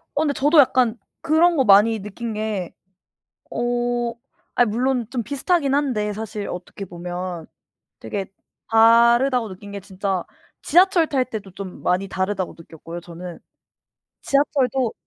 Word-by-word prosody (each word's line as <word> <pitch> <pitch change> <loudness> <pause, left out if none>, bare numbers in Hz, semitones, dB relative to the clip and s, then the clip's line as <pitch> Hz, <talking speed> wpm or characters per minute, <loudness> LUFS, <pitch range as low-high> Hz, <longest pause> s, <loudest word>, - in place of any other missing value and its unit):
어 290 - +1
근데 295 -2 +1
저도 295 +4 +3
약간 245 -3 +3 0.2
그런 330 +2 +3
거 270 - +3
많이 210 +2 +5
느낀 215 +3 -6
게 210 -4 -3 0.8
어 240 0 -1 0.4
아 245 - +5
물론 245 +2 0
좀 245 -3 -3
비슷하긴 285 - 0
한데 250 -8 0
사실 210 -1 -5
어떻게 180 +2 -7
보면 175 -1 -6 0.5
되게 190 - -4 0.4
다르다고 235 +2 +5
느낀 200 +2 -10
게 200 - -5
진짜 190 -1 -3 0.4
지하철 355 0 +4
탈 270 -4 +1
때도 210 -6 -7
좀 190 0 -8
많이 185 +2 +1
다르다고 190 0 -2
느꼈고요 165 +1 -10
저는. 175 0 -9 0.8
지하철도 270 -4 +1
225 Hz, 265 characters per minute, -22 LUFS, 195-265 Hz, 0.8 s, 많이